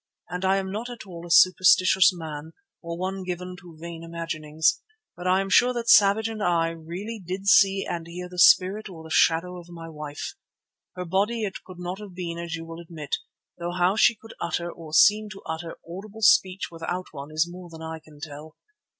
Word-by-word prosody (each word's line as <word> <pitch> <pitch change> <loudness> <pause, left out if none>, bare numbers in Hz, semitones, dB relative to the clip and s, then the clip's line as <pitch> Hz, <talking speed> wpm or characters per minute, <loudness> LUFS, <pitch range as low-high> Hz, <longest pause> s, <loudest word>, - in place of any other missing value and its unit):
I 190 +2 +1
am 190 -1 -3
not 225 +5 -4
at 240 -3 -9
all 175 -2 -9
a - - -12
superstitious 185 +1 +6
man, 160 -2 -7 0.3
or 170 0 -5
one 190 +2 -3
given 180 0 -5
to 175 -3 -14
vain 165 0 -8
imaginings, 160 -2 -1 0.3
but 180 +1 -5
I 185 +1 +4
am 195 - -4
sure 250 +1 +5
that 235 -1 +1
Savage 210 +2 +6
and 220 -1 -5
I 170 -3 +2
really 175 +7 -7
did 185 +3 -5
see 195 -1 +5
and 170 -2 -4
hear 180 +1 -7
the 180 0 -8
spirit 195 +5 +5
or 165 -4 -10
the 160 - -11
shadow 180 +3 +2
of 175 0 -14
my 165 -1 -9
wife. 150 -2 -6 0.6
Her 180 0 -4
body 205 +6 0
it 195 -2 -4
could 185 -1 -12
not 180 +2 -5
have 205 -4 -10
been 170 -2 -4
as 170 -1 -4
you 165 0 -7
will 165 0 -9
admit, 160 -4 -4 0.4
though 175 +1 -3
how 180 +2 +2
she 230 +1 +5
could 225 +1 -13
utter, 170 0 -2
or 165 -3 -11
seem 210 +6 +5
to 195 - -13
utter, 160 +1 -5
audible 205 +5 -8
speech 195 -4 +4
without 170 +2 -4
one 140 -1 -8
is 155 +1 +2
more 175 0 -10
than 160 -1 -10
I 160 0 -6
can 155 -2 -18
tell. 155 +1 -9
175 Hz, 205 wpm, -25 LUFS, 165-195 Hz, 0.6 s, superstitious